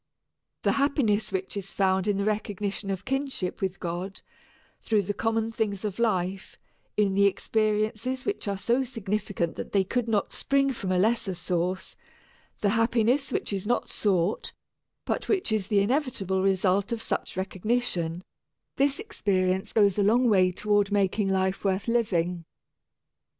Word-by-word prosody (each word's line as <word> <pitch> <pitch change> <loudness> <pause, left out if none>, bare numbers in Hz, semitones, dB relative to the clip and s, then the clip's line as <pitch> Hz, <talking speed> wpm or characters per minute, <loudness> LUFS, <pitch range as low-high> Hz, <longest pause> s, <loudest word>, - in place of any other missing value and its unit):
The - - +3
happiness 275 -7 +1
which 190 +1 -3
is 195 -1 -4
found 190 0 +1
in 205 -1 +2
the 200 - 0
recognition 205 -1 -2
of 190 -1 -3
kinship 270 -9 -2
with 190 0 -2
God, 180 +2 -4 0.6
through 215 -2 +1
the 205 - -2
common 225 +2 0
things 215 -3 -2
of 205 0 -4
life, 190 -3 -1 0.4
in 205 -2 +3
the 200 +1 +5
experiences 215 +5 0
which 410 - -2
are 200 -1 -1
so 240 +6 +1
significant 210 -7 -2
that - - -6
they 195 -1 +4
could 235 +5 -1
not 215 -3 0
spring 275 0 +1
from 195 -6 -3
a 185 - +2
lesser 215 -1 +1
source, 180 +1 -2 0.7
the 205 - +3
happiness 230 +5 +2
which - - -1
is 195 +1 -3
not 245 - 0
sought, 190 -1 0 0.5
but - - -2
which 385 - +1
is 210 -3 0
the 200 -1 +3
inevitable 205 - 0
result 195 +2 +2
of 230 - -1
such 205 - -3
recognition 185 -3 -1 0.5
this 280 0 +2
experience 190 - 0
goes 205 -2 +3
a - - +4
long 240 +5 +4
way 185 -4 +4
toward 205 +1 +1
making 200 0 +1
life 190 0 0
worth 195 +1 0
living. 180 -7 +1
205 Hz, 155 wpm, -27 LUFS, 190-225 Hz, 0.7 s, the